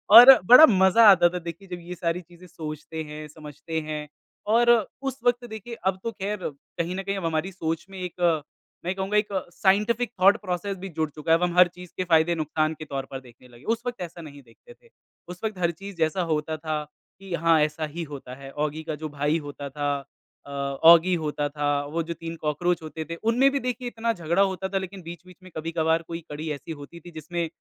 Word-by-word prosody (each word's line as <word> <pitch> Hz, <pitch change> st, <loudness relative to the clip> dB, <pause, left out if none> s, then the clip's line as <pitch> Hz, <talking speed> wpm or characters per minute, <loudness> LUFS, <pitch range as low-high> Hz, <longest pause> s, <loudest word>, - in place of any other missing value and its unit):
और 245 Hz, +3 st, +13 dB
बड़ा 250 Hz, -, +10 dB
मज़ा 190 Hz, +3 st, +6 dB
आता 175 Hz, -2 st, +5 dB
था 180 Hz, +1 st, -4 dB
देखिए 170 Hz, +3 st, -8 dB
जब 180 Hz, -1 st, -6 dB
ये 180 Hz, -, -5 dB
सारी 170 Hz, +1 st, -2 dB
चीज़ें 175 Hz, +1 st, -17 dB
सोचते 160 Hz, -1 st, -7 dB
हैं, 150 Hz, 0 st, -8 dB
समझते 155 Hz, +1 st, -6 dB
हैं। 150 Hz, -1 st, -5 dB, 0.5 s
और 240 Hz, +1 st, +4 dB, 0.3 s
उस 270 Hz, -1 st, -4 dB
वक़्त 245 Hz, 0 st, +2 dB
देखिए 220 Hz, +2 st, -7 dB
अब 190 Hz, 0 st, +1 dB
तो 230 Hz, -, -2 dB
ख़ैर 205 Hz, +1 st, -4 dB
कहीं 170 Hz, +5 st, -6 dB
न 195 Hz, -, -4 dB
कहीं 200 Hz, 0 st, -2 dB
अब 180 Hz, -, -4 dB
हमारी 165 Hz, +3 st, -1 dB
सोच 165 Hz, -2 st, -3 dB
में 190 Hz, -1 st, -9 dB
एक 175 Hz, -4 st, 0 dB, 0.4 s
मैं 180 Hz, -, 0 dB
कहूँगा 195 Hz, +2 st, -1 dB
एक 210 Hz, -, +2 dB, 0.3 s
साइंटिफ़िक 210 Hz, +4 st, +2 dB
थॉट 195 Hz, +2 st, +7 dB
प्रोसेस 190 Hz, +1 st, -3 dB
भी 190 Hz, +1 st, -7 dB
जुड़ 160 Hz, -1 st, -2 dB
चुका 155 Hz, +2 st, -4 dB
है। 165 Hz, -, +7 dB
अब 180 Hz, -, -3 dB
हम 175 Hz, 0 st, -1 dB
हर 180 Hz, 0 st, +8 dB
चीज़ 180 Hz, 0 st, -12 dB
के 185 Hz, -, 0 dB
फ़ायदे 170 Hz, 0 st, +3 dB
नुकसान 155 Hz, 0 st, 0 dB
के 155 Hz, -, -6 dB
तौर 135 Hz, -2 st, -4 dB
पर 135 Hz, -, -5 dB
देखने 125 Hz, 0 st, -18 dB
लगे। 120 Hz, +2 st, -17 dB
उस 230 Hz, -, -5 dB
वक़्त 245 Hz, -5 st, -4 dB
ऐसा 170 Hz, 0 st, -7 dB
नहीं 145 Hz, -3 st, -11 dB
देखते 120 Hz, -, -18 dB
थे। 475 Hz, -1 st, -26 dB, 0.4 s
उस 180 Hz, 0 st, -9 dB
वक़्त 215 Hz, -3 st, -2 dB
हर 170 Hz, -1 st, +2 dB
चीज़ 195 Hz, +3 st, -10 dB
जैसा 160 Hz, +3 st, +1 dB
होता 155 Hz, +1 st, -1 dB
था 155 Hz, -1 st, -3 dB, 0.4 s
कि 195 Hz, -2 st, -8 dB
हाँ 165 Hz, -1 st, +3 dB
ऐसा 155 Hz, +1 st, 0 dB
ही 170 Hz, -, -3 dB
होता 130 Hz, -2 st, -8 dB
है। 135 Hz, -, -8 dB
औगी 150 Hz, +2 st, -3 dB
का 155 Hz, -1 st, -4 dB
जो 155 Hz, +1 st, -6 dB
भाई 145 Hz, +2 st, 0 dB
होता 140 Hz, -1 st, -7 dB
था 145 Hz, 0 st, -1 dB, 0.5 s
अ, -, -, -10 dB
औगी 160 Hz, +6 st, +5 dB
होता 150 Hz, -1 st, -2 dB
था 145 Hz, 0 st, -2 dB, 0.2 s
वो 165 Hz, +1 st, -1 dB
जो 170 Hz, -, -2 dB
3 165 Hz, 0 st, -7 dB
कॉकरोच 165 Hz, +3 st, 0 dB
होते 160 Hz, +1 st, -6 dB
थे 170 Hz, -, -3 dB
उनमें 260 Hz, +4 st, +4 dB
भी 280 Hz, -, 0 dB
देखिए 250 Hz, 0 st, -3 dB
इतना 230 Hz, -1 st, -1 dB
झगड़ा 170 Hz, +1 st, 0 dB
होता 190 Hz, -1 st, 0 dB
था 195 Hz, -, -1 dB
लेकिन 190 Hz, 0 st, -5 dB
बीच-बीच 175 Hz, +2 st, -11 dB
में 185 Hz, -, -13 dB
कभी-कभार 160 Hz, 0 st, 0 dB
कोई 165 Hz, 0 st, -5 dB
कड़ी 155 Hz, +2 st, -5 dB
ऐसी 150 Hz, +3 st, -8 dB
होती 150 Hz, +3 st, -9 dB
थी 175 Hz, +2 st, -13 dB
जिसमें 165 Hz, +2 st, -4 dB
170 Hz, 225 wpm, -25 LUFS, 155-190 Hz, 0.5 s, और